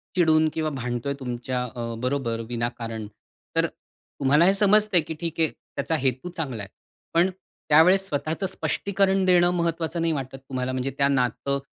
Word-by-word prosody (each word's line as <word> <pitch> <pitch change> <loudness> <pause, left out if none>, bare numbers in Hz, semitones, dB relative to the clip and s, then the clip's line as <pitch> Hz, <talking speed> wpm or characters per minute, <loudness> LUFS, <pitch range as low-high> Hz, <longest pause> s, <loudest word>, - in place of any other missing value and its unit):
चिडून 160 -3 +4
किंवा 155 -1 -1
भांडतोय 125 -1 -3
तुमच्या 125 0 -3
अ, 120 -1 -5
बरोबर, 125 -2 -1
विनाकारण. 115 -2 -4 0.5
तर - - +3
तुम्हाला 145 +4 0
हे 190 - +5
समजतंय 205 -2 +4
की 160 - -6
ठीक 165 -1 -4
आहे 160 -1 +3
त्याचा 140 +3 -4
हेतू 130 +4 -1
चांगला 140 - -4
आहे. 100 - -8 0.4
पण 170 +3 +4 0.4
त्यावेळेस 180 +6 +6
स्वतःचं 155 +4 -2
स्पष्टीकरण 195 0 +1
देणं 175 -1 +5
महत्त्वाचं 170 -1 -1
नाही 165 -1 +1
वाटत 135 -2 -4
तुम्हाला, 130 -1 -4
म्हणजे 130 +1 -2
त्या 140 - +3
नातं 140 +1 0
145 Hz, 155 wpm, -25 LUFS, 125-170 Hz, 0.5 s, त्यावेळेस